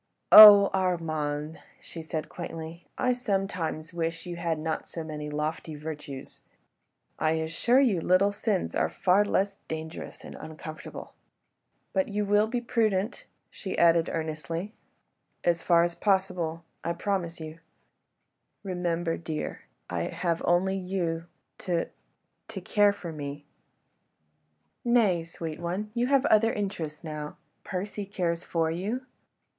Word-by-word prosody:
"Oh! 205 -2 +12
Armand!" 160 -4 -1 0.2
she 165 - -9
said 160 -1 -4
quaintly, 165 -1 -7
"I 250 0 +2
sometimes 195 -9 -2
wish 165 0 -3
you 175 -1 -5
had 170 -2 -1
not 160 0 -3
so 165 - -6
many 150 -1 -5
lofty 150 +1 -3
virtues.... 150 -3 -8 0.8
I 155 0 +2
assure 160 +11 +2
you 225 -11 +3
little 185 +4 +4
sins 205 -2 -1
are - - +2
far 190 +2 +3
less 200 -1 0
dangerous 160 0 -6
and - - -9
uncomfortable. 155 0 -9 0.8
But 285 -1 +1
you 210 -1 -1
will 205 +2 +3
be 240 +2 -2
prudent?" 220 -3 0 0.3
she 190 - -6
added 170 -1 +4
earnestly. 160 +4 -4 0.7
"As 170 -1 +2
far 170 -1 +4
as 175 0 0
possible... 180 -3 0 0.2
I 170 - -1
promise 175 -2 -2
you." 160 0 -8 1.0
"Remember, 175 -3 -1
dear, 160 -2 -5 0.2
I 85 -2 -2
have 170 -2 -1
only 190 +3 +2
you... 180 -3 -2 0.3
to... 175 -2 -1 0.6
to 195 - -6
care 205 +2 +3
for 185 -4 -7
me... 145 -1 -6 0.7
." - - -46
"Nay, 225 -9 +3
sweet 165 -1 -6
one, 185 +5 -3
you 240 +1 +1
have 275 0 +3
other 225 -1 +4
interests 175 -7 -4
now. 150 -2 -6 0.3
Percy 200 +2 -4
cares 175 -3 -2
for 165 -1 0
you. 210 +10 -3
170 Hz, 130 wpm, -28 LUFS, 160-200 Hz, 1.0 s, Oh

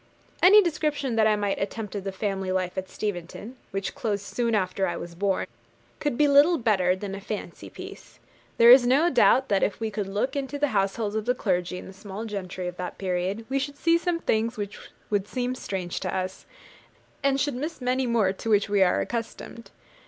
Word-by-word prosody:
Any 405 +3 +8
description 300 -6 -1
that 220 -1 +4
I 215 - +4
might 205 -1 -1
attempt 210 +1 -4
of 200 -2 -5
the 195 - -2
family 190 -1 -2
life 185 -1 -1
at 190 0 -4
Steventon, 205 +4 -5
which 195 0 -3
closed 205 -4 -2
soon 235 0 0
after 190 -1 0
I 175 - -3
was 170 - -7
born, 195 +2 0 0.5
could 290 -5 -1
be 295 - +4
little 290 +5 +6
better 190 - +2
than 195 +1 -6
a 195 - -6
fancy 210 +1 -6
piece. - - -11 0.4
There 235 +1 +8
is 250 -1 +8
no 290 +7 +4
doubt 260 +1 +4
that 200 -1 +2
if 205 - 0
we 220 -1 -2
could 205 -2 -3
look 210 +8 -2
into 280 0 -3
the 290 0 +1
households 205 0 0
of 215 -1 -2
the 250 +1 +1
clergy 180 -5 -1
and - - -9
the 190 - -10
small 200 +2 -7
gentry 185 -4 -5
of 180 0 -6
that 180 - -5
period, 190 +3 -2
we 275 +1 0
should 285 +1 -4
see 335 +2 +3
some 350 -1 0
things 230 -3 0
which 205 -1 -5 0.3
would 205 -1 0
seem 250 +1 -2
strange 190 -8 -4
to 185 - -3
us, 185 0 -4 0.7
and 275 0 +2
should 290 0 0
miss 300 +6 -4
many 255 0 0
more 220 -5 +2
to 225 - -6
which 210 -1 +3
we 205 -1 +2
are 180 -2 +4
accustomed. 230 0 -6
215 Hz, 210 wpm, -26 LUFS, 190-255 Hz, 0.7 s, Any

